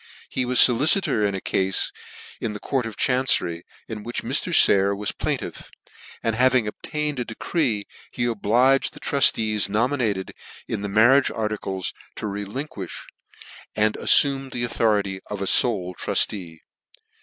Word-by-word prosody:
He 130 - -1
was 125 0 +2
foli 125 +4 +5
citor 110 - +3
in 100 - -3
a - - -3
caufe 95 0 0 0.5
in 110 - -3
the 105 - -7
court 130 -1 -2
of 110 - -9
chancery, 125 -10 +1 0.2
in 110 -2 -7
which 120 +3 -5
Mr. - - 0
Sayer 100 0 +4
was 105 +1 -2
plaintiff, - - -5 0.5
and 115 -1 0
having 130 -1 +3
obtained 150 +5 -4
a - - -1
de 115 - -9
cree, 120 - -1 0.2
he 120 - -3
obliged 120 +4 +2
the - - -11
truftees 110 -7 +2
nominated 110 -3 -1 0.3
in 105 - -4
the'mar 110 +7 +4
riage - - -5
articles 105 -4 -3 0.2
to - - -6
relinquifh, 100 - -6 0.7
andaffumed 135 +5 +3
the 120 - -3
autho 110 -3 +1
rity 95 -1 -6
of 105 - -5
a 100 - -3
fole 95 -4 +3
truftee. 85 -3 -1
110 Hz, 150 wpm, -23 LUFS, 100-125 Hz, 0.7 s, foli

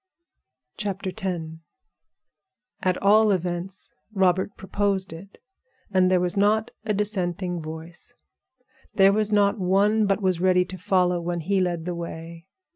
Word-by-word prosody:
X 200 -2 -3 1.8
At 185 -1 +1
all 210 +2 +5
events 180 +1 -3 0.2
Robert 190 -1 +1
proposed 195 0 -1
it, 190 +5 -12 0.5
and 185 -1 +3
there 185 -1 +3
was 175 -1 -1
not 215 +3 +2
a 220 - -2
dissenting 185 -4 -1
voice. 160 +6 -9 0.8
There 195 0 +6
was 215 0 +1
not 205 0 +3
one 200 +3 +2
but 195 0 +1
was 185 -4 0
ready 180 -1 +3
to 185 +1 -9
follow 180 -2 +1
when 170 0 -3
he 195 +4 +1
led 175 -3 -1
the 180 - -2
way. 170 0 -8
185 Hz, 130 wpm, -24 LUFS, 175-200 Hz, 1.8 s, There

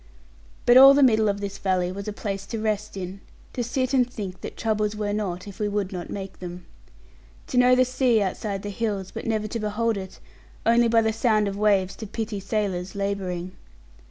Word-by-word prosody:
But 240 +1 +7
all 270 +1 +10
the 285 - +5
middle 220 -4 +4
of 200 0 -2
this 200 -1 -5
valley 185 -2 0
was 200 +2 -7
a - - -1
place 195 -1 -5
to 225 - -4
rest 215 -1 -2
in; 190 +1 -6 0.3
to 245 - -2
sit 255 +2 -1
and 250 -2 +3
think 195 -6 -6
that - - -7
troubles 215 -1 0
were 210 -1 -2
not, 195 -3 -3
if 200 - -10
we 210 - 0
would 205 -2 -2
not 175 -1 -5
make 195 -1 -7
them. 180 0 -8 0.8
To 250 - +2
know 250 0 +6
the 255 0 +4
sea 255 -2 +2
outside 195 0 -2
the 205 - -4
hills, 200 -3 -3
but - - -6
never 215 -1 0
to 230 +2 -4
behold 215 +1 0
it; 190 -1 -7 0.5
only 235 +1 +5
by 230 0 +4
the 220 0 +1
sound 215 -2 +2
of 195 - -3
waves 200 -2 +2
to 220 - -7
pity 215 0 -4
sailors 195 -3 -2
labouring. 190 -3 -3
210 Hz, 210 wpm, -25 LUFS, 195-225 Hz, 0.8 s, all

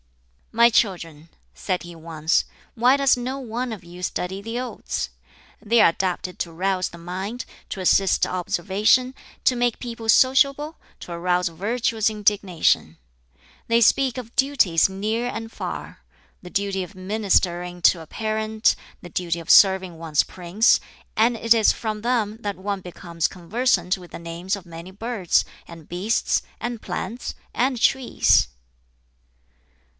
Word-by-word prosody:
"My 235 +1 +6
children," 165 -8 0 0.2
said 185 -2 -3
he 175 0 -10
once, 160 -1 0 0.3
"why 250 +3 +4
does 275 -1 +4
no 255 +2 -4
one 245 0 -4
of 215 -5 -7
you 175 +1 -12
study 180 +2 -3
the 225 +3 -4
Odes? 245 - -4 0.5
They 230 +2 +3
are - - +7
adapted 180 +1 -3
to 170 - -3
rouse 185 +2 -1
the 170 - -12
mind, 190 +8 -5 0.2
to - - -5
assist 190 +1 +3
observation, 200 +8 +1 0.3
to 255 - +4
make 240 -1 0
people 230 -2 -6
sociable, 275 +5 +4 0.3
to - - -9
arouse 180 +1 0
virtuous 220 +5 0
indignation. 195 - +1 0.7
They 230 0 +4
speak 260 +2 +3
of 240 -2 -8
duties 245 - +3
near 215 +5 -2
and 225 -2 -5
far - - -6 0.4
the 180 - -10
duty 195 0 -1
of 185 +3 -11
ministering 185 -3 0
to 175 - +5
a 160 - -11
parent, 220 +2 0 0.3
the 175 - -10
duty 170 0 -2
of 165 - -11
serving 190 -3 +5
one's 160 -3 +1
prince; 185 +5 +2 0.4
and 230 +2 +3
it 230 +1 +4
is 225 -2 +4
from 215 -2 -4
them 225 -3 0
that 205 -2 -3
one 200 +1 -3
becomes 170 -2 -3
conversant 185 0 0
with 175 -1 -13
the - - -7
names 170 +4 -3
of 195 -3 -11
many 170 +1 -10
birds, 215 -2 0 0.2
and 165 -2 -12
beasts, 190 +6 0 0.2
and 240 -2 -4
plants, 240 +2 -5 0.2
and 255 0 0
trees." 260 - +3
200 Hz, 145 wpm, -23 LUFS, 175-230 Hz, 0.7 s, are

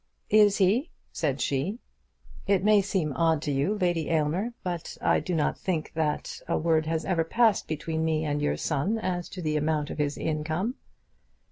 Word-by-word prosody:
"Is 210 -2 +6
he?" 215 - +2 0.2
said - - -1
she. 145 - -1 0.7
"It 195 -2 +3
may 210 -1 +5
seem 185 -7 -1
odd 165 -1 +2
to 150 - -1
you, 140 +10 +1
Lady 175 -5 0
Aylmer, 165 +9 0
but 175 -2 -4
I - - +3
do 180 - -3
not 155 - 0
think 165 -5 -2
that 155 -2 -2
a - - +1
word 160 -1 +1
has 160 0 -1
ever 175 -4 +1
passed 225 +4 +2
between 160 +1 -2
me 160 -1 0
and 145 -1 -1
your 145 - 0
son 165 +9 0
as 180 -5 -3
to 180 - -7
the 155 -1 0
amount 150 -1 0
of - - -7
his 145 -1 0
income." 160 +8 -1
165 Hz, 180 wpm, -27 LUFS, 155-195 Hz, 0.7 s, Is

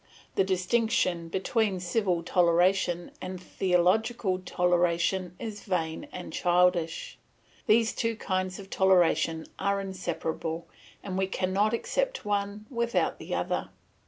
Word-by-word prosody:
The - - +3
distinction 185 -2 +1
between 195 +2 0
civil 180 -1 0
toleration 175 0 +2
and 185 0 -5
theological 185 +3 +1
toleration 180 0 +1
is 220 -3 -6
vain 165 -4 -2
and 180 - -7
childish. 175 -2 +1 0.5
These 225 +1 +4
two 230 -1 -1
kinds 185 -3 -2
of 195 -1 -11
toleration 175 -4 +3
are 200 0 +1
inseparable, 170 -3 -4 0.4
and 190 -1 -3
we 190 - +1
cannot 195 +4 +1
accept - - -2
one 205 0 -2
without 235 -1 0
the - - -4
other. - - -2
185 Hz, 115 wpm, -28 LUFS, 175-205 Hz, 0.5 s, These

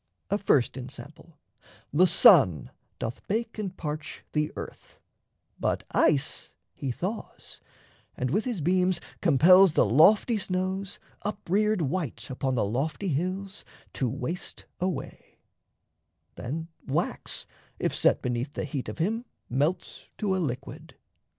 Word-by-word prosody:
A 205 - +2
first 135 -10 +2
ensample: 145 +5 -10 0.6
the 180 +5 +6
sun 165 - +6 0.3
doth 115 +3 -4
bake 225 +2 -2
and 190 -3 -4
parch 150 -1 -5
The 150 0 0
earth; - - -9 0.6
but - - 0
ice 150 -1 +1 0.2
he 140 -4 -4
thaws, 190 - -6 0.6
and 125 0 -1
with 210 +7 +1
his 235 -9 -2
beams 180 +2 +2 0.2
Compels 180 +3 +7
the - - +4
lofty 205 - +5
snows, 185 0 -2 0.2
up 210 0 -5
reared 210 0 +2
white 155 -3 -3
Upon 130 0 -1
the 110 - +1
lofty 145 - -2
hills, 185 +6 -2 0.3
to 130 - -1
waste 165 +11 -5
away; 185 0 -4 1.0
Then, 160 +7 -5 0.2
wax, 150 +6 -2 0.3
if - - -1
set - - +3
beneath 125 +3 -2
the - - -3
heat 140 -2 -4
of - - -7
him, 220 +8 -1 0.3
Melts 150 +8 -1
to 200 -3 0
a - - 0
liquid. 140 +1 -5
165 Hz, 130 wpm, -27 LUFS, 140-190 Hz, 1.0 s, Compels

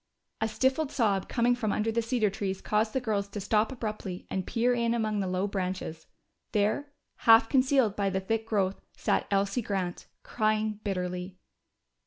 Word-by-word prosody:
A 220 - +2
stifled 265 +6 +1
sob 200 -6 +1
coming 240 0 +3
from 230 -4 -1
under 215 +2 0
the 230 +1 +1
cedar 230 -3 +1
trees 195 -1 -3
caused 215 +2 0
the 265 - +1
girls 210 -5 -1
to 200 +1 -6
stop 210 +3 +1
abruptly 215 -7 -5
and 190 -1 -2
peer 245 +1 +2
in 235 -1 +1
among 215 -2 0
the 195 - -1
low 185 +1 0
branches. 185 -5 -4 0.5
There, 215 +8 +1 0.3
half 225 0 +6
concealed 260 -4 +3
by 200 -1 +1
the 190 0 0
thick 225 +3 -2
growth, 195 -3 0 0.2
sat - - 0
Elsie 200 +4 +1
Grant, 190 -5 -3 0.2
crying 215 -1 0
bitterly. 180 -1 -3
215 Hz, 170 wpm, -29 LUFS, 195-230 Hz, 0.5 s, half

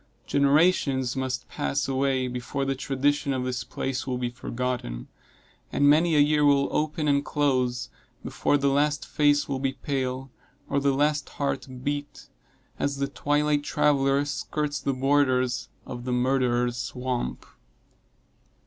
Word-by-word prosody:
Generations 140 -3 +2
must 130 -2 -3
pass 140 0 -2
away 135 -1 +1
before 125 +3 -3
the 135 - 0
tradition 140 +1 0
of 130 -1 -1
this 125 -1 -2
place 135 0 -4
will 125 -1 -1
be 125 -1 -2
forgotten; 120 - -4 0.6
and 145 - +3
many 160 +3 +4
a - - +5
year 150 +1 +4
will 140 -1 +3
open 155 0 0
and 140 -1 +3
close, 130 -4 0 0.3
before 145 - +1
the 140 0 +1
last 145 +2 +1
face 145 -1 +2
will 135 -2 -2
be 135 0 -1
pale, 130 -2 -3 0.4
or 140 - +1
the 140 0 +2
last 145 +1 +1
heart 140 -1 -2 0.2
beat, 145 +1 -4 0.5
as 140 0 -1
the 140 0 0
twilight 145 +1 +1
traveler 140 -1 +2
skirts 145 0 -2
the 140 - -1
borders 130 -2 +1 0.2
of 120 -1 -7
the 125 - -2
Murderer's 125 -1 +1
Swamp. 125 0 -3
135 Hz, 140 wpm, -26 LUFS, 130-145 Hz, 0.6 s, a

